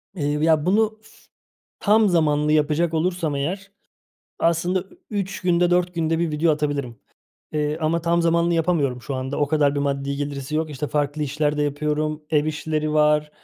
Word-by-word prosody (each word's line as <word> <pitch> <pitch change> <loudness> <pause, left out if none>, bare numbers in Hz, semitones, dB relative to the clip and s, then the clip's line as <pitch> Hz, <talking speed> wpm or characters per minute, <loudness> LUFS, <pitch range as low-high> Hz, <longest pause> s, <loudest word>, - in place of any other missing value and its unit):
Eee, 155 -6 -2 0.2
ya 160 -2 +3
bunu 215 +3 +2
f 220 - -19 0.7
tam 215 0 +4
zamanlı 150 -3 +2
yapacak 155 +2 +2
olursam 165 -2 0
eğer, 190 +8 -3 0.7
aslında 170 +3 +1
ü 350 - -17
3 200 -2 -3
günde 175 -1 +2
4 180 0 +2
günde 165 -1 0
1 170 -2 0
video 155 +2 +2
atabilirim, 145 -6 -2 0.5
eee, 150 0 -1
ama 160 +2 +1
tam 170 +1 +1
zamanlı 170 +1 +2
yapamıyorum 155 -7 0
şu 140 - -5
anda. 130 +2 -3
O 145 - +2
kadar 145 -2 +2
bir 140 - -1
maddi 140 0 -2
getirisi 140 0 -4
yok. 160 0 -1
İşte 150 +1 -4
farklı 145 +1 -1
işler 150 +1 -1
de 150 - +1
yapıyorum, 150 +1 -1
ev 150 -2 +3
işleri 155 0 -2
var, 150 0 +3
155 Hz, 175 wpm, -23 LUFS, 145-170 Hz, 0.7 s, tam